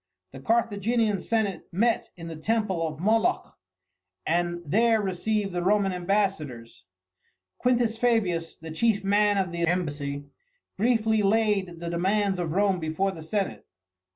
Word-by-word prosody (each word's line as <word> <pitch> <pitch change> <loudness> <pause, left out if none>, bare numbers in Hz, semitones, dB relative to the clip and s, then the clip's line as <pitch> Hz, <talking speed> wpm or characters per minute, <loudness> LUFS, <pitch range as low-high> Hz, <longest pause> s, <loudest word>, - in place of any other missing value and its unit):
The - - -10
Carthaginian 225 -1 +1
senate 205 -3 -1
met 230 +6 +1
in 165 -1 -8
the 165 - -6
temple 190 -1 0
of 155 -1 -7
Moloch 225 - +1 0.7
and 175 +1 0
there 225 +8 +3
received 200 +1 -1
the 175 0 -2
Roman 195 +1 +2
ambassadors. 175 - -2 0.8
Q. 250 -1 +3
Fabius, 220 -8 0
the 160 0 -9
chief 205 +4 +1
man 205 +1 +3
of 190 -3 0
the 170 0 -1
embassy, 145 -5 -2 0.5
briefly 220 0 +2
laid 200 -4 +1
the 170 0 -4
demands 190 +2 +1
of 165 -3 -2
Rome 195 -1 +2
before 160 +5 -1
the 165 -4 -9
senate. 160 - -3
195 Hz, 135 wpm, -26 LUFS, 170-215 Hz, 0.8 s, there